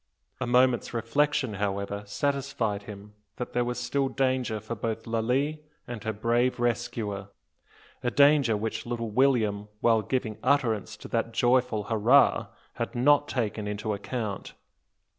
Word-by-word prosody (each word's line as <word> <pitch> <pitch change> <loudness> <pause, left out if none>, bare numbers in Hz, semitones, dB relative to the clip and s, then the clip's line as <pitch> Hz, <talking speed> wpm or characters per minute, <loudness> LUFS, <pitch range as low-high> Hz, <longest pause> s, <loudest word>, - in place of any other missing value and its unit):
A 130 - -2
moment's 125 0 +3
reflection, 130 +1 +1
however, 100 0 -2
satisfied 115 -2 -1
him 105 0 -11 0.2
that 125 - -6
there 120 - +2
was 120 0 -3
still 135 +2 0
danger 130 -5 0
both 110 +1 -4
for - - -11
Lalee 130 +7 0 0.3
and 120 -3 -6
her 110 - -1
brave 120 +4 +1
rescuer, 115 -4 -2 0.7
a 125 - 0
danger 140 -4 +4
which 110 +2 -4
little 115 -2 -3
William 110 -5 +2
while 115 -1 +3
giving 110 -1 -2
utterance 115 -6 +1
to - - -10
that 115 0 -1
joyful 120 -2 +2
"Hurrah!" 115 +6 +4 0.3
had - - -3
not 145 +4 +4
taken 110 -4 -2
into 105 +1 -2
account. 105 0 -5
115 Hz, 140 wpm, -27 LUFS, 105-130 Hz, 0.7 s, danger